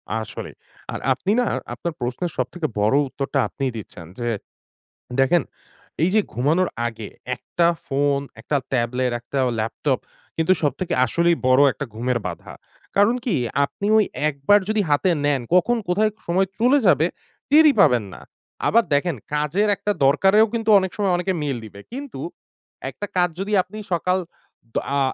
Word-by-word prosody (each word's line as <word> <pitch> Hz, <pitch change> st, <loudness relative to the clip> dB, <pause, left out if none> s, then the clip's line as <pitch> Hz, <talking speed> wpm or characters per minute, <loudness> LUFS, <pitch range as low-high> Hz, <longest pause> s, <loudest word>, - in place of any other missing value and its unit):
আসলেই, 110 Hz, -1 st, -6 dB, 0.4 s
আর -, -, -4 dB
আপনি 190 Hz, +9 st, -2 dB
না -, -, +1 dB, 0.3 s
আপনার 170 Hz, -2 st, -4 dB
প্রশ্নের 125 Hz, +8 st, -3 dB
সবথেকে 140 Hz, +6 st, -2 dB
বড় 105 Hz, +6 st, +3 dB
উত্তরটা 135 Hz, +1 st, -2 dB
আপনিই 135 Hz, -2 st, -3 dB
দিচ্ছেন। 90 Hz, -5 st, -9 dB
যে 120 Hz, 0 st, -1 dB, 0.9 s
দেখেন 145 Hz, +6 st, +4 dB, 0.6 s
এইযে 185 Hz, +5 st, +3 dB
ঘুমানোর 160 Hz, +9 st, +2 dB, 0.2 s
আগে 115 Hz, -2 st, -7 dB, 0.3 s
১ -, -, -23 dB, 0.2 s
টা 170 Hz, -, +6 dB, 0.2 s
ফোন, 140 Hz, 0 st, +1 dB, 0.2 s
১ -, -, -13 dB
টা 145 Hz, -, +4 dB
ট্যাবলেট, 125 Hz, 0 st, 0 dB
১ 120 Hz, -, -27 dB
টা 140 Hz, -, +1 dB
অ -, -, 0 dB
ল্যাপটপ 125 Hz, +4 st, -1 dB, 0.4 s
কিন্তু 165 Hz, +3 st, +3 dB
সবথেকে 145 Hz, +5 st, -1 dB
আসলেই 170 Hz, +6 st, +2 dB
বড় 130 Hz, +2 st, +5 dB
একটা 140 Hz, -, -5 dB
ঘুমের 120 Hz, +1 st, -1 dB
বাধা। -, -, -8 dB, 0.4 s
কারণ 205 Hz, +4 st, +4 dB
কি? 225 Hz, -9 st, +1 dB, 0.3 s
আপনি 200 Hz, -, -7 dB
ওই 215 Hz, -, +4 dB, 0.2 s
একবার 145 Hz, +9 st, +3 dB
যদি 215 Hz, -1 st, +2 dB
হাতে 145 Hz, +6 st, +3 dB, 0.2 s
নেন, 140 Hz, -3 st, +2 dB
কখন 240 Hz, +7 st, +3 dB
কোথায় 215 Hz, +4 st, +2 dB
ক -, -, -35 dB
সময় 190 Hz, +3 st, +2 dB
চলে 250 Hz, +5 st, +5 dB
যাবে 155 Hz, -1 st, +5 dB, 0.4 s
টেরই 305 Hz, 0 st, +7 dB
পাবেন 125 Hz, -, +4 dB
না। -, -, -11 dB, 0.5 s
আবার 230 Hz, +2 st, +4 dB
দেখেন 155 Hz, +3 st, +1 dB, 0.2 s
কাজের 150 Hz, +8 st, +1 dB
একটা 200 Hz, +2 st, -2 dB
দরকারেও 195 Hz, +9 st, +5 dB
কিন্তু 225 Hz, -1 st, -1 dB
অনেক 190 Hz, -2 st, -3 dB
সময় 195 Hz, -3 st, +1 dB
অনেকে 180 Hz, +2 st, -1 dB
মেইল 140 Hz, -4 st, -1 dB
দিবে। 100 Hz, -2 st, -12 dB
কিন্তু 270 Hz, -, -7 dB, 0.7 s
একটা 205 Hz, -, -6 dB
কাজ 180 Hz, 0 st, +3 dB
যদি 200 Hz, +2 st, -3 dB
আপনি 210 Hz, +4 st, -11 dB, 0.2 s
সকাল 180 Hz, +2 st, +1 dB, 0.6 s
দ -, -, +1 dB, 0.2 s
আ -, -, +2 dB
165 Hz, 165 wpm, -22 LUFS, 130-195 Hz, 0.9 s, টেরই